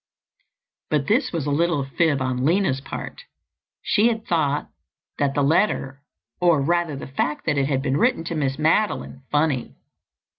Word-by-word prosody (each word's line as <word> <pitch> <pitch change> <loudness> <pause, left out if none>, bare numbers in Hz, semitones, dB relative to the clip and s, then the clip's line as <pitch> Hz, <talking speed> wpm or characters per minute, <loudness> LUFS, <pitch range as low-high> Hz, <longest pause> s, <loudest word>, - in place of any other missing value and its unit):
But 150 -3 +1
this 235 - +1
was 165 -5 -2
a 145 - -1
little 165 -1 +1
fib 140 0 +1
on 130 -1 -1
Lina's 160 -4 +2
part. 315 - -7 0.6
She 215 +2 +3
had 225 -2 -1
thought 150 -4 0 0.5
that 140 -1 +1
the 145 - +2
letter 140 -4 +1 0.4
or, 170 -4 +4
rather, 170 +1 0
the 135 - -7
fact 140 +2 -2
that 150 -3 +1
it 135 - +1
had 135 -2 0
been 135 -1 0
written 240 -6 +2
to 170 - -4
Miss 135 -4 -1
Madeline, 160 -2 0
funny. 145 -4 0
150 Hz, 160 wpm, -23 LUFS, 135-170 Hz, 0.6 s, or